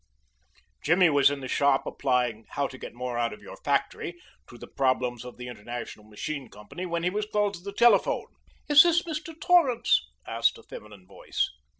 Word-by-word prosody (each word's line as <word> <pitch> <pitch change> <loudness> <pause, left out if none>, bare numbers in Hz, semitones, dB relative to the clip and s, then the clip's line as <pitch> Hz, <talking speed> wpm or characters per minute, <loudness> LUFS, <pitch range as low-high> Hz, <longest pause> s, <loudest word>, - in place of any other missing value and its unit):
Jimmy 175 +1 +4
was 140 -1 +5
in 140 -1 -4
the 130 - -5
shop 140 +1 +2
applying 125 -4 -1
"How 140 - -1
to 130 -1 -7
Get - - -9
More 125 -1 -4
Out 115 -2 0
of - - -13
Your - - -10
Factory" - - -2 0.3
to - - -12
the - - -10
problems 125 -3 -1
of 125 0 -10
the 125 0 -8
International 120 -1 -7
Machine 125 +5 -6
Company 105 - -8
when 170 -1 -2
he 180 - +1
was 210 +2 -2
called 205 -1 +1
to 170 - -9
the 200 - -6
telephone. 240 - +3 0.4
"Is 295 0 +9
this 345 +1 +3
Mr. 325 0 -6
Torrance?" 290 -9 +4 0.2
asked - - +1
a - - -15
feminine 105 -3 -12
voice. - - -3
140 Hz, 190 wpm, -27 LUFS, -, 0.4 s, Is